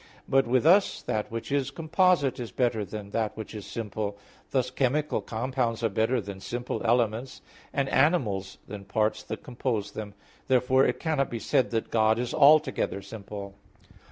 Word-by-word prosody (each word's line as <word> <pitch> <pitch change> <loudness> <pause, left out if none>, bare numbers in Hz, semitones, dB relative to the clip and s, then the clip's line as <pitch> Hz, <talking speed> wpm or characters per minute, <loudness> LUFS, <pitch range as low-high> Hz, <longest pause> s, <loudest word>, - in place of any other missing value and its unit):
But 135 -1 +3
with 125 +2 +2
us 195 +5 +5
that 105 -1 -2
which 115 +4 -5
is 140 -2 +1
composite 165 -2 +2
is 120 -2 -5
better 120 -4 0
than 105 0 -7
that 110 -1 -1
which 110 - -7
is 105 -3 -7
simple; 105 -1 -4 0.3
thus, 125 -2 0
chemical 140 +4 0
compounds 120 0 -2
are 115 - +3
better 110 +5 +1
than 100 -2 -7
simple 120 +5 -4
elements, 120 +2 0 0.3
and 140 -1 0
animals 125 - +1
than 105 0 -7
the - - -15
parts 110 +2 0
that - - -7
compose 120 -7 -2
them. 105 -2 -7 0.3
Therefore 130 +1 +4
it - - -1
cannot 155 -5 0
be 120 - -4
said 125 - +1
that 115 -2 -2
God 110 0 +3
is 120 0 -2
altogether 145 -8 +4
simple. 100 -1 -8
120 Hz, 170 wpm, -27 LUFS, 110-135 Hz, 0.3 s, us